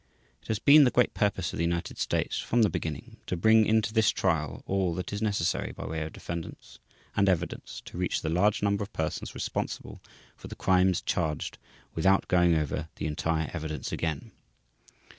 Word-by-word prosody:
It - - -19
has 110 - 0
been 145 +7 +7
the 130 - +5
great 125 0 +2
purpose 95 -5 0
of - - -4
the 85 - 0
United 85 0 -2
States - - -1
from 120 -1 +2
the 105 - +3
beginning 80 -3 -5
to 90 - -2
bring 110 +4 +5
into 110 -1 +2
this 110 -2 +4
one - - -1
trial 80 -6 -1
all 95 -3 0
that 90 +2 -5
is 100 - -3
necessary 105 -6 0
by - - -8
way 80 0 -3
of 80 0 -4
defendants 85 -1 -7 0.4
and 100 0 +3
evidence 90 -2 -2
to - - -8
reach 90 - -1
the - - -2
large 100 +6 +2
number 100 0 +1
of 100 - -5
persons 80 -1 -3
responsible - - -4 0.3
for - - -11
the - - -8
crimes 95 -1 +2
charged 80 -4 -2 0.3
without 95 +4 +2
going 90 -2 +4
over 75 0 -2
the - - -5
entire 80 +1 -1
evidence 80 -2 -4
again. 80 -4 -3
90 Hz, 190 wpm, -28 LUFS, 80-105 Hz, 0.4 s, been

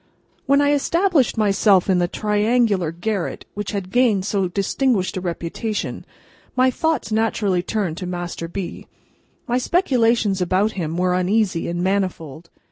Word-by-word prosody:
WHEN 280 +1 +4
I 285 0 +3
established 330 -2 +2
myself 200 -2 +3
in 185 -2 +3
the 175 - +2
triangular 210 -3 +1
garret 180 +2 -3
which 205 -1 -4
had 195 -2 -4
gained 225 -6 +2
so 200 -2 0
distinguished 200 +2 0
a 185 - -3
reputation, 180 +5 -4 0.5
my 255 0 +4
thoughts 320 -4 -1
naturally 215 -4 +1
turned 180 -3 -2
to 180 - -5
Master 175 -1 -4
B. 180 +1 -6 0.6
My 245 +1 +1
speculations 235 - +2
about 185 +4 +1
him 165 -5 -4
were 180 0 +1
uneasy 185 -1 +1
and 175 +1 -2
manifold. 175 -5 -2
200 Hz, 140 wpm, -21 LUFS, 180-230 Hz, 0.6 s, WHEN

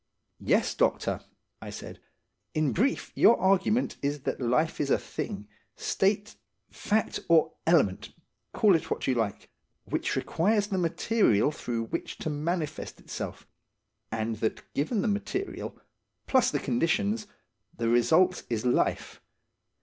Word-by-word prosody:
"Yes, - - +2
doctor," - - 0 0.4
I - - -7
said. - - -8 0.6
"In 155 -3 +1
brief, 260 +9 0
your 235 - +5
argument 195 +5 +2
is 145 0 -1
that - - -3
life 140 +8 +1
is 140 - -1
a - - +4
thing, 105 - -6 0.3
state, 205 +1 0 0.3
fact, 215 +1 0
or 160 -1 +4
element, 145 - +3 0.4
call 210 -3 +4
it 165 - -2
what - - -2
you 130 - +2
like, 115 -4 -2 0.3
which - - -1
requires 205 +5 +1
the 190 -2 0
material 170 - +2
through 120 -6 -3
which 170 +9 -5
to 155 - -3
manifest 155 +1 -3
itself, - - -6 0.7
and 110 0 -2
that 110 +1 -3
given 190 - 0
the - - 0
material, 220 - -3 0.5
plus 260 -2 +3
the 145 - 0
conditions, 200 - 0 0.5
the 115 - -1
result 160 +10 +4
is 115 0 -2
life. 125 - 0
160 Hz, 135 wpm, -28 LUFS, 125-200 Hz, 0.7 s, your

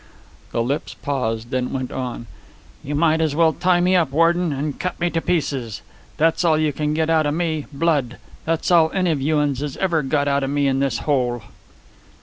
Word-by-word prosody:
The 115 - 0
lips 140 +6 -3
paused, 120 -4 -3
then 125 -1 -1
went 130 -1 -3
on. 125 -2 -5 0.6
"You 145 +2 -3
might 160 +1 +2
as 155 -3 0
well 160 0 +4
tie 180 +1 +2
me 180 +1 +3
up, 170 -6 +3
warden, 165 +2 +2
and 145 +1 -3
cut 180 -1 -3
me 175 0 0
to 165 - -1
pieces. 135 - -2 0.3
That's 165 +3 +2
all 160 -3 +3
you 155 -1 +1
can 150 +1 -1
get 160 0 +1
outa 155 -2 +2
me 160 -2 -2
blood. 140 -5 0 0.3
That's 165 +2 -1
all 165 -2 +5
any 185 -3 +2
of 145 -4 -1
you 155 +3 +1
uns 145 -3 0
has 145 -1 -4
ever 175 -5 +1
got 145 +1 0
outa 140 -1 +1
me 145 +1 0
in 135 -1 +1
this 135 -4 0
hole." 125 -6 0
150 Hz, 200 wpm, -21 LUFS, 135-165 Hz, 0.6 s, all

